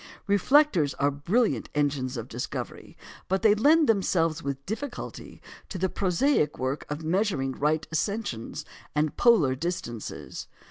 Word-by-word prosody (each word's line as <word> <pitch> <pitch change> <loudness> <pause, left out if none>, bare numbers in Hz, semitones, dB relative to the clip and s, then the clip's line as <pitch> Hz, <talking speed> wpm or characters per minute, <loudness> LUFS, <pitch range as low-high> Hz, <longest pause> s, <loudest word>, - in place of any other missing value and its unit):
Reflectors 205 - +3
are 145 +1 +1
brilliant 185 - 0
engines 140 -3 0
of 115 0 -5
discovery, 125 -1 -6 0.3
but 190 +3 0
they 215 -2 +6
lend 295 +8 +4
themselves 165 -6 +1
with 140 -1 -5
difficulty 245 +5 -6 0.3
to 190 - -5
the 190 +1 0
prosaic 185 - +1
work 130 +3 -3
of 150 +2 -4
measuring 170 -5 0
right 150 +3 0
ascensions 165 - -3 0.3
and 150 0 +1
polar 210 - +4
distances. 130 - -5
165 Hz, 130 wpm, -27 LUFS, 140-210 Hz, 0.3 s, they